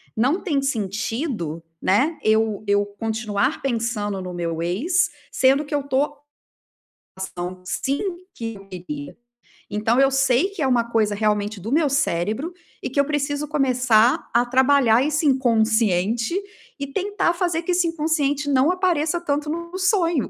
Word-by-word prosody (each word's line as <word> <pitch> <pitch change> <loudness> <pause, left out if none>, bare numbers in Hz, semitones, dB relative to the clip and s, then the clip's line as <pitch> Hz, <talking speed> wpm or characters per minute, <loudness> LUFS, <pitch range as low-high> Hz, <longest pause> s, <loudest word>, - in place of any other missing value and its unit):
Não 265 - +2
tem 295 -8 0
sentido, 220 - -2 0.2
né, 270 - +2
eu 220 -1 +2
eu 205 0 +3
continuar 220 +4 -2
pensando 225 -6 -2
no 180 -1 -6
meu 165 -2 -3
ex, 285 - +1 0.2
sendo 270 +3 +3
que 290 - -3
eu 285 - 0
tô 280 +2 0 1.0
ação 180 -1 -6
sim 270 +9 -2 0.3
que 225 -1 -5
eu 195 0 -14
queria. 280 +11 -7 0.5
Então, 220 +4 +1
eu 270 0 +5
sei 270 +3 +3
que 400 -4 -7
é 270 - +2
uma 240 -2 +2
coisa 215 -3 +1
realmente 210 0 0
do 225 +8 -4
meu 310 -2 +3
cérebro 265 - -1 0.3
e - - -3
que 265 - -9
eu - - +6
preciso 290 0 -2
começar 255 -2 +3
a 240 +1 +4
trabalhar 260 -2 +4
esse 305 +1 0
inconsciente 225 - +2 0.5
e 280 - -3
tentar 390 +4 0
fazer 345 -2 -1
que 360 - -1
esse 355 0 +2
inconsciente 300 -3 0
não 275 +4 +4
apareça 345 -3 +1
tanto 295 -2 -2
no 340 +2 -4
no 370 - -5
sonho, 350 - +1
260 Hz, 155 wpm, -22 LUFS, 215-300 Hz, 1.0 s, eu